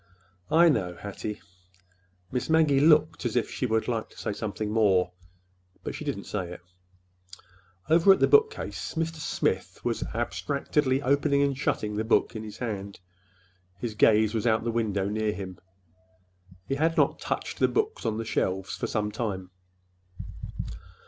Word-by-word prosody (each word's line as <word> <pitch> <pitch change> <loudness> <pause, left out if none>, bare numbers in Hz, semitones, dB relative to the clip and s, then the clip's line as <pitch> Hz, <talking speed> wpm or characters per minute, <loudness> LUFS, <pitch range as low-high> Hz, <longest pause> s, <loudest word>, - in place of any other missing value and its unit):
"I 165 +3 +6
know, 90 - +1
Hattie." 105 +2 -6 0.9
Miss 125 +3 -2
Maggie 155 -4 +4
looked 155 0 +4
as 120 -2 -2
if 120 -3 0
she 125 - -1
would 110 -1 0
like 115 -2 -2
to - - -20
say - - -3
something 105 0 -4
more—but 90 -3 -2
she - - -6
did - - -2
not - - -8
say 90 -4 -4
it. 90 - -11 1.3
Over 165 +5 +6
at 190 - +5
the - - +5
bookcase 440 - +2
Mr. 165 0 -2
Smith 155 - -1
was - - -1
abstractedly 140 -1 0
opening 140 +1 +3
and 140 -1 +1
shutting 105 -5 -1
the 110 - 0
book 110 - +2
in 110 - -4
his 105 0 -8
hand. 100 -4 -5 0.8
His 120 -3 -4
gaze 110 0 +4
was 115 +1 0
out 110 -1 +2
the 115 - -1
window 105 -4 0
near 105 +1 0
him. 95 -1 -7 1.1
He - - -1
had 160 +4 +1
not 145 -3 +3
touched - - -3
the - - +5
books 435 0 -1
on 110 - -1
the 115 - -3
shelves 95 -3 -1
for - - -3
some 105 -1 -1
time. 95 -6 -4
110 Hz, 160 wpm, -27 LUFS, 100-140 Hz, 1.3 s, I